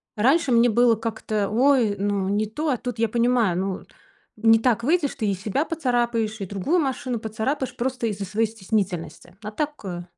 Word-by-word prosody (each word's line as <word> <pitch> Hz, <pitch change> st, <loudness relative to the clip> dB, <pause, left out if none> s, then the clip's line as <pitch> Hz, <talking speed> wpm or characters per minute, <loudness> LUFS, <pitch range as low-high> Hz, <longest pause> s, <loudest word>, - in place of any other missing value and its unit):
раньше 270 Hz, +6 st, +3 dB
мне 235 Hz, +1 st, +5 dB
было 235 Hz, +1 st, +4 dB
как-то: 220 Hz, -2 st, -2 dB
"Ой, 240 Hz, -3 st, +3 dB
ну 200 Hz, -1 st, -1 dB
не 210 Hz, +2 st, +1 dB
то". 300 Hz, +9 st, -3 dB
А 255 Hz, -, +1 dB
тут 245 Hz, -1 st, -5 dB
я 230 Hz, -2 st, +2 dB
понимаю, 235 Hz, -6 st, +2 dB
ну, 190 Hz, -1 st, -3 dB, 0.5 s
не 225 Hz, 0 st, +5 dB
так 235 Hz, -1 st, +1 dB
выйдешь, 310 Hz, 0 st, +1 dB
ты 215 Hz, -, -2 dB
и 200 Hz, -, +1 dB
себя 210 Hz, -, -1 dB
поцарапаешь, 240 Hz, -7 st, -1 dB
и -, -, -2 dB
другую 205 Hz, -, 0 dB
машину 255 Hz, -4 st, -2 dB
поцарапаешь, 225 Hz, +5 st, -3 dB
просто 250 Hz, -1 st, -2 dB
из-за 200 Hz, -2 st, -3 dB
своей 220 Hz, +4 st, 0 dB
стеснительности. 190 Hz, -5 st, -4 dB
А 210 Hz, -, -5 dB
так, 300 Hz, +6 st, -2 dB
э. 175 Hz, -2 st, -5 dB
225 Hz, 185 wpm, -24 LUFS, 205-250 Hz, 0.5 s, мне